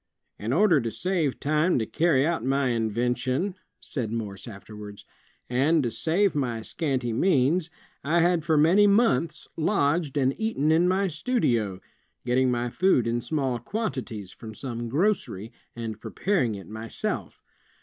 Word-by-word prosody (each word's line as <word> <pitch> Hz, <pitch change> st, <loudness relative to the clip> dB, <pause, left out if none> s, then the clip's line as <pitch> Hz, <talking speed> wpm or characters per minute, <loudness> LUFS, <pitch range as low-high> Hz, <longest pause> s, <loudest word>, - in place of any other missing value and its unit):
''In 110 Hz, +3 st, -3 dB
order 175 Hz, -1 st, +4 dB
to 115 Hz, -, -2 dB
save 165 Hz, -, -1 dB
time 155 Hz, +4 st, +2 dB
to 115 Hz, -, 0 dB
carry 150 Hz, 0 st, +2 dB
out 165 Hz, -6 st, -1 dB
my 135 Hz, 0 st, +1 dB
invention," 125 Hz, -, 0 dB, 0.3 s
said 120 Hz, -6 st, -4 dB
Morse 105 Hz, -2 st, -5 dB
afterwards, 105 Hz, -1 st, -10 dB, 0.4 s
"and 140 Hz, +5 st, +2 dB
to 120 Hz, -, -1 dB
save 185 Hz, -, +1 dB
my 120 Hz, -6 st, -2 dB
scanty 130 Hz, -5 st, -2 dB
means, 160 Hz, +4 st, +2 dB, 0.3 s
I 165 Hz, +5 st, +2 dB
had 175 Hz, -1 st, +2 dB
for 160 Hz, -1 st, +2 dB
many 180 Hz, +8 st, +5 dB
months 205 Hz, -4 st, +2 dB
lodged 155 Hz, -3 st, +1 dB
and 135 Hz, -1 st, +2 dB
eaten 220 Hz, -9 st, +1 dB
in 165 Hz, +3 st, +4 dB
my 190 Hz, +2 st, +2 dB
studio, 125 Hz, -, 0 dB, 0.4 s
getting 125 Hz, +1 st, +2 dB
my 120 Hz, -1 st, -1 dB
food 185 Hz, -8 st, +3 dB
in 120 Hz, +1 st, 0 dB
small 130 Hz, -1 st, -1 dB
quantities 125 Hz, -, -4 dB
from 110 Hz, -2 st, -10 dB
some 120 Hz, -2 st, -5 dB
grocery, 135 Hz, -, -1 dB, 0.2 s
and 110 Hz, -2 st, -5 dB
preparing 170 Hz, -, 0 dB
it 95 Hz, -, -9 dB
myself. 110 Hz, +1 st, -5 dB
135 Hz, 145 wpm, -26 LUFS, 115-170 Hz, 0.4 s, many